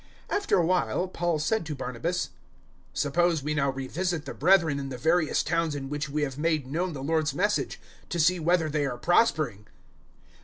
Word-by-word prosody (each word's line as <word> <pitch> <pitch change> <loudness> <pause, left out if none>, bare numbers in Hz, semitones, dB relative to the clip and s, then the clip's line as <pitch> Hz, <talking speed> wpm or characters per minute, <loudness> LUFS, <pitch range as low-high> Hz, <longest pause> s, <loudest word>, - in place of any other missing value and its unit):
015:036 - - +3
After 405 - +1
a 175 - +3
while 180 +1 +1
Paul 175 -2 -1
said 195 +8 0
to 150 - -3
Barnabas, 130 +7 -3 0.6
"Suppose 165 +1 +1
we 150 +1 -1
now 140 -2 +1
revisit 155 +5 -2
the - - -5
brethren 165 -3 +3
in 135 -1 -5
the 130 - -5
various 160 +4 +2
towns 165 -3 0
in 135 -1 -5
which 145 +1 -3
we 150 +1 -1
have 135 -1 -3
made 155 -3 +1
known 170 +6 -2
the 135 -2 -6
Lord's 155 0 0
Message 205 +3 0 0.3
to 175 - -2
see 175 +3 +4
whether 170 0 +2
they 150 -2 0
are 125 -2 -4
prospering!" 150 - +2
155 Hz, 190 wpm, -27 LUFS, 140-175 Hz, 0.6 s, see